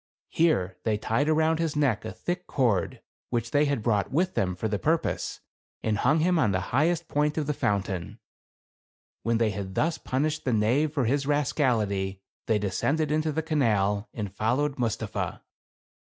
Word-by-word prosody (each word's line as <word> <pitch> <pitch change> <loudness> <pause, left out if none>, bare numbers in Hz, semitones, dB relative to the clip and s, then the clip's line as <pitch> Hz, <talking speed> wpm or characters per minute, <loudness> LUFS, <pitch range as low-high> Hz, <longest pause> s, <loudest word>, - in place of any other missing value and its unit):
Here 125 - +1
they 110 -2 +1
tied 115 +7 0
around 160 +1 +2
his 165 -3 -1
neck 130 -8 +1
a - - -4
thick 180 +1 -4
cord, 115 - 0 0.3
which 120 -1 -2
they 145 0 +4
had 140 -6 -1
brought 105 -4 +1
with 180 +6 +1
them 90 - 0
for 110 - -2
the 105 -2 -1
purpose, 160 +1 -1 0.4
and 105 -2 0
hung 150 +5 +3
him 175 0 +3
on 110 -9 +3
the 95 - +1
highest 165 +5 +2
point 150 +1 0
of 155 - 0
the 150 - 0
fountain. 100 - -2 1.0
When 115 +1 +1
they 115 -2 +2
had 95 -2 -5
thus 165 +1 +1
punished 150 +4 -1
the 125 - 0
knave 120 +8 +2
for 140 -5 0
his 140 +4 0
rascality, 110 -10 +1 0.3
they 110 - +3
descended 145 +10 0
into 155 0 +1
the 160 +2 -2
canal 110 - +1
and 105 -4 -5
fol 110 +4 +1
lowed 145 -1 -1
Mustapha. 115 -4 -2
130 Hz, 175 wpm, -27 LUFS, 105-155 Hz, 1.0 s, they